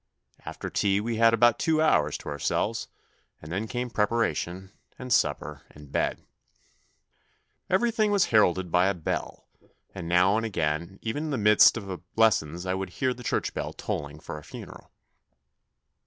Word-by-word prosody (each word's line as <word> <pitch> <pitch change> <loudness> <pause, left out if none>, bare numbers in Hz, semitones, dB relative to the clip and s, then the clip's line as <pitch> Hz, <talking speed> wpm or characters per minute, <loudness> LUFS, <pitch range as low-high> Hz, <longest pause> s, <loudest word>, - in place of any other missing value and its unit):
After - - -6
tea 100 -1 +1
we 115 +2 -2
had 115 0 +5
about 120 0 +4
two 160 -2 +1
hours 75 - +2
to - - -9
ourselves 70 -1 -1 0.5
and 75 - -11
then 100 +5 -2
came 125 0 -4
preparation, 105 -4 -1 0.3
and 125 -1 -2
supper - - 0
and 75 -2 -15
bed. - - -1 1.4
Everything 215 +2 +2
was 200 -3 +3
heralded 95 -4 +3
by 90 +2 +4
a 100 - 0
bell, 85 - -4 0.5
and 90 -4 -7
now 90 +4 +4
and 115 - -1
again 85 -3 -2
even 145 +8 -3
in - - -3
the 140 - -1
midst 105 +1 +6
of 95 -4 -6
lessons 90 -6 +2
I 95 - -1
would 95 0 -3
hear 130 -2 0
the 125 - -12
church 120 - -2
bell - - -4
tolling 75 +1 -5
for 75 - -7
a - - -16
funeral. - - -11
100 Hz, 160 wpm, -27 LUFS, 90-120 Hz, 1.4 s, midst